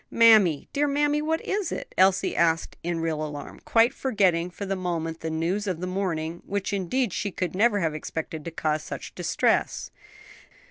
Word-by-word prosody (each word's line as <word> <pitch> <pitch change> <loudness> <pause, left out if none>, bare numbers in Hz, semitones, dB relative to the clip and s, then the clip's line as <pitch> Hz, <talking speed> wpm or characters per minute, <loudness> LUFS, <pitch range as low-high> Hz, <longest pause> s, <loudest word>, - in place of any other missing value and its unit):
"Mammy, 215 -10 +5
dear 290 +1 +2
mammy, 295 +1 +1
what 320 +1 0
is 395 -3 -2
it?" - - -6
Elsie 190 0 +3
asked 165 -1 +1
in 170 -1 -2
real 160 -2 -1
alarm, 150 -1 -7
quite 230 +2 +4
forgetting 185 -9 +1
for 200 +3 -7
the 195 0 -1
moment 165 -3 -3
the 160 - -4
news 170 +6 -1
of 180 -4 -2
the 180 - -3
morning, 175 -3 -2
which 200 +1 -3
indeed 200 +3 0
she 200 - -2
could 180 -3 -3
never 205 +1 +3
have 160 -3 0
expected 160 +1 -5
to 170 - -4
cause 155 -2 -1
such - - -7
distress. - - 0
185 Hz, 180 wpm, -26 LUFS, 165-215 Hz, -, Mammy